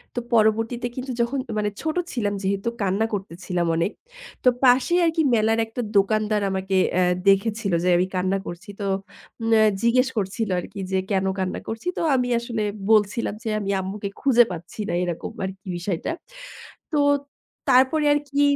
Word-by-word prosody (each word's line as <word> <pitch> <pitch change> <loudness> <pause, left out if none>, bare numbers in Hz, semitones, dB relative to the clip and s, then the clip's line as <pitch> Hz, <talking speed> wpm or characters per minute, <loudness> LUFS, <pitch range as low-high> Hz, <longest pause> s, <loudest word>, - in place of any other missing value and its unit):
তো - - 0
পরবর্তীতে 225 +2 +2
কিন্তু 260 0 -4
যখন 245 +4 0 0.2
মানে 210 0 +1
ছোট 315 -1 -2 0.2
ছিলাম 210 -5 -1
যেহেতু 195 +3 0
কান্না 200 +3 +1
করতেছিলাম 180 -2 -3
অনেক। 170 +5 0 0.5
তো 255 - +7
পাশে 255 +6 +5
আরকি 325 0 +2
মেলার 225 +1 +2
একটা 225 +2 -5 0.2
দোকানদার 215 +1 +2
আমাকে 190 0 -2 0.2
অ্যা 185 - +4 0.3
দেখেছিলো 200 0 +2
যে 180 - +2
আমি 180 +1 +1
কান্না 185 +1 +1
করছি। 175 +4 -8
তো - - -2 0.7
ম্যা 220 -1 +6 0.2
জিজ্ঞেস 255 +3 +3
করছিলো 200 +1 -1
আরকি 195 +3 -8
যে, 190 - +2
কেনো 190 -1 +1
কান্না 185 -1 -2
করছি? 225 +7 -5
তো - - -1
আমি 250 -1 +1
আসলে 235 -2 -4 0.3
বলছিলাম 210 0 +2
যে 225 - -2
আমি 200 -1 -4
আম্মুকে 200 +2 -4
খুঁজে 250 -3 +6
পাচ্ছি 175 +4 -8
না, - - -1
এরকম 175 -2 -4
আরকি 190 +1 -8
বিষয়টা। 175 - -3 0.8
তো - - +2 0.7
তারপরে 265 +4 +4
আরকি 285 -1 -1
210 Hz, 160 wpm, -23 LUFS, 190-240 Hz, 0.8 s, তো